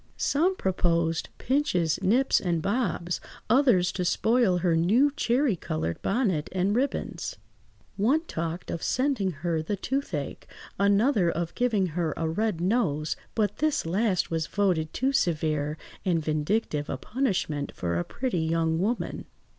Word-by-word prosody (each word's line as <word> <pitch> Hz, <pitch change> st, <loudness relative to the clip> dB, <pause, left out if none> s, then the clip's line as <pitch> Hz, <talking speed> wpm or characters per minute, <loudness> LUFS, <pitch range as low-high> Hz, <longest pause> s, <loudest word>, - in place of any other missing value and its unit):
Some 345 Hz, +7 st, +2 dB
proposed 170 Hz, -, 0 dB
"pinches, 185 Hz, -, +1 dB
nips, 250 Hz, +8 st, +3 dB
and 175 Hz, -3 st, 0 dB
bobs," 190 Hz, -2 st, -1 dB, 0.3 s
others 240 Hz, -9 st, +4 dB
to 180 Hz, -, -2 dB
spoil 220 Hz, +2 st, +2 dB
her 175 Hz, -1 st, +2 dB
new 220 Hz, -, +4 dB
cherry–coloured 205 Hz, -, 0 dB
bonnet 195 Hz, -, 0 dB
and 190 Hz, +3 st, +1 dB
ribands. 270 Hz, +4 st, -2 dB, 0.6 s
One 255 Hz, +10 st, +3 dB
talked 170 Hz, -, -4 dB
of 170 Hz, -, -4 dB
sending 255 Hz, -7 st, +1 dB, 0.2 s
her 165 Hz, -2 st, +1 dB
the 180 Hz, +6 st, -2 dB
toothache, 195 Hz, -, -3 dB, 0.3 s
another 200 Hz, -1 st, +3 dB
of 170 Hz, 0 st, -2 dB
giving 230 Hz, -6 st, +1 dB
her 165 Hz, -1 st, -2 dB
a 165 Hz, -, -1 dB
red 205 Hz, +2 st, -1 dB
nose, 175 Hz, -6 st, 0 dB, 0.2 s
but 210 Hz, -2 st, 0 dB
this 310 Hz, -, +1 dB
last 185 Hz, +2 st, +1 dB
was 160 Hz, -2 st, -1 dB
voted 180 Hz, -6 st, 0 dB
too 265 Hz, +3 st, 0 dB
severe 155 Hz, -, 0 dB, 0.3 s
and 180 Hz, -3 st, +2 dB
vindictive 155 Hz, 0 st, -1 dB
a -, -, -2 dB
punishment 185 Hz, -, -1 dB
for 85 Hz, -1 st, -1 dB
a -, -, 0 dB
pretty 250 Hz, -, -2 dB
young 160 Hz, 0 st, +1 dB
woman. 225 Hz, +6 st, -2 dB
185 Hz, 140 wpm, -27 LUFS, 165-240 Hz, 0.6 s, others